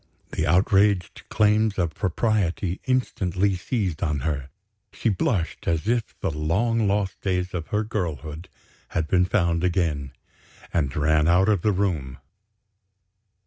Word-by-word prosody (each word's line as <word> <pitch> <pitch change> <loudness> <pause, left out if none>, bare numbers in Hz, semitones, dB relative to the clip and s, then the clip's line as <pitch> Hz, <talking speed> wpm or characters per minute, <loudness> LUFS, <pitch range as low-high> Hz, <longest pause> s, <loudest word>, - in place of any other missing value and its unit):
The - - -1
outraged 95 +2 +3
claims 105 0 +2
of 85 -4 0
propriety 95 -2 0
instantly 100 -7 0
seized 90 -3 -2
on 75 -4 0
her. 70 -2 -2 0.4
She - - -1
blushed 95 -3 -1
as 85 +3 0
if 115 -1 -1
the - - 0
long 100 +9 +1
lost 100 -1 -1
days 90 -1 -1
of 85 -3 -4
her 105 +1 0
girlhood 85 -5 -4 0.5
had 80 -2 0
been 90 +1 +3
found 85 -3 +1
again, 85 -7 0 0.6
and 70 -4 0
ran 75 0 +3
out 90 +4 +4
of 100 -5 +2
the 105 - +2
room. 85 -10 -1
90 Hz, 135 wpm, -24 LUFS, 80-105 Hz, 0.6 s, out